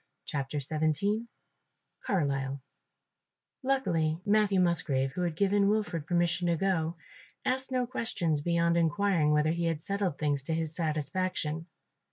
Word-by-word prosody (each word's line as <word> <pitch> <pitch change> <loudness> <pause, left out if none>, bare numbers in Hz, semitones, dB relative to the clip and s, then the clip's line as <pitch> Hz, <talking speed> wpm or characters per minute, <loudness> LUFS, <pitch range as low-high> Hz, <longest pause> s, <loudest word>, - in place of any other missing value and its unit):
CHAPTER 140 +1 -3
XVII 160 - 0 0.8
CARLISLE 140 -7 0 1.0
Luckily 170 - +1
Matthew 205 -2 +3
Musgrave, 140 -7 +2
who 180 - -4
had 170 -3 -1
given 200 +2 +3
Wilfred 205 -8 -1
permission 175 0 +1
to 170 - +3
go, 170 -2 0 0.5
asked 265 +1 0
no 255 -1 +1
questions 180 - -1
beyond 170 +1 +2
inquiring 170 -1 +2
whether 150 +1 +3
he 170 +1 -1
had 165 -2 0
settled 195 -6 -1
things 145 -2 0
to 160 - -1
his 160 -1 -2
satisfaction. 160 +1 -2
170 Hz, 130 wpm, -30 LUFS, 155-200 Hz, 1.0 s, Matthew